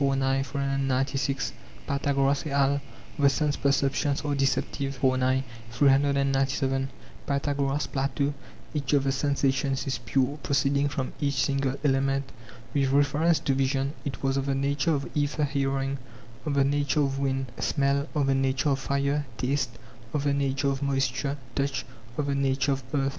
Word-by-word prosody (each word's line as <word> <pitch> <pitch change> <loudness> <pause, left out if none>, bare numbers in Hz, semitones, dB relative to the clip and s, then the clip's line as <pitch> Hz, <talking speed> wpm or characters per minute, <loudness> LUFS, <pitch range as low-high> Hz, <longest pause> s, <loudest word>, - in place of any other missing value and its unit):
9; 135 -1 +2
396. 135 0 -1 0.3
Pythagoras 140 0 +1
et - - -3
al.: 140 0 +2 0.4
The 140 -1 +6
sense 145 +1 +1
perceptions 140 0 +1
are 145 - 0
deceptive. 135 0 0
iv. 130 -1 +3
9; 130 +1 +2 0.4
897. 135 -1 +2 0.4
Pythagoras, 140 0 0
Plato: 140 +1 -1 0.4
Each 145 -2 -1
of 140 -2 +4
the 135 - +1
sensations 135 -1 0
is 135 -2 -2
pure, 135 +5 0
proceeding 140 0 +2
from 135 -2 -3
each 140 -1 +1
single 135 0 +1
element. 135 -1 +1 0.4
With 140 -2 +2
reference 145 +4 +3
to 135 - +1
vision, 135 +1 0
it 140 -1 -5
was 135 0 +1
of 135 0 -1
the 135 - +1
nature 140 +3 +1
of 140 - -3
aether; 150 +1 0
hearing, 135 -1 0 0.5
of 145 - 0
the 140 - +4
nature 145 +2 +1
of 135 -1 0
wind; 135 -2 -1
smell, 140 0 +1
of 145 -2 +2
the 135 - +3
nature 135 +2 +1
of 135 -1 +1
fire; 140 +1 0
taste, 130 -1 -1 0.4
of 145 - 0
the 140 -1 +2
nature 140 0 +1
of 135 0 -2
moisture; 140 0 0 0.2
touch, 140 -2 -1 0.3
of 150 - 0
the 140 - 0
nature 140 0 +1
of 135 -1 -1
earth. 135 -1 +2
140 Hz, 160 wpm, -27 LUFS, 135-140 Hz, 0.5 s, The